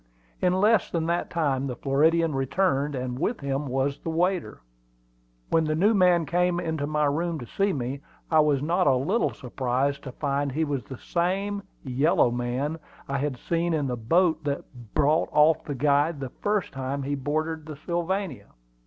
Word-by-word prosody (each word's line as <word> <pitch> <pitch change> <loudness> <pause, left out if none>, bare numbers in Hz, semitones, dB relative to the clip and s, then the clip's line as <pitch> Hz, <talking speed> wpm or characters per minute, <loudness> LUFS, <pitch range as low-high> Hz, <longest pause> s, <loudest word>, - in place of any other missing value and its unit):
In 180 - +3
less 210 0 +3
than 165 -2 -1
that 170 +1 -1
time 140 -5 0
the 125 - -4
Floridian 160 +5 +2
returned, 140 +1 0
and 125 0 -3
with 230 - -1
him 140 +1 -2
was 135 +2 -1
the - - -5
waiter. 175 - -1 0.9
When 165 - +4
the 155 0 0
new 200 +8 +4
man 180 -4 +4
came 175 +1 +1
into 160 -4 -2
my 150 0 +1
room 165 +4 0
to 125 - -7
see 195 - 0
me, 135 -2 -3 0.3
I 160 - +5
was 145 -3 +3
not 175 +2 +2
a 135 - +5
little 185 - +1
surprised 130 +2 -1
to 130 - -5
find 140 +1 -1
he 160 +3 +1
was 140 -7 -2
the 130 - -8
same 195 +6 -1 0.2
"yellow 130 -1 +2
man" 125 +6 -2 0.3
I 140 0 -1
had 140 -2 -2
seen 170 +4 0
in 150 -2 0
the 125 -2 -1
boat 160 +7 +2
that 145 -1 -2 0.3
brought 150 +2 +3
off 150 +2 +4
the 145 - -4
guide 145 +3 +2
the 135 -2 -4
first 205 -1 -1
time 135 +1 -3
he 140 +2 -2
boarded 155 +3 -2
the 155 - -6
Sylvania. 170 - -3
150 Hz, 180 wpm, -26 LUFS, 135-170 Hz, 0.9 s, I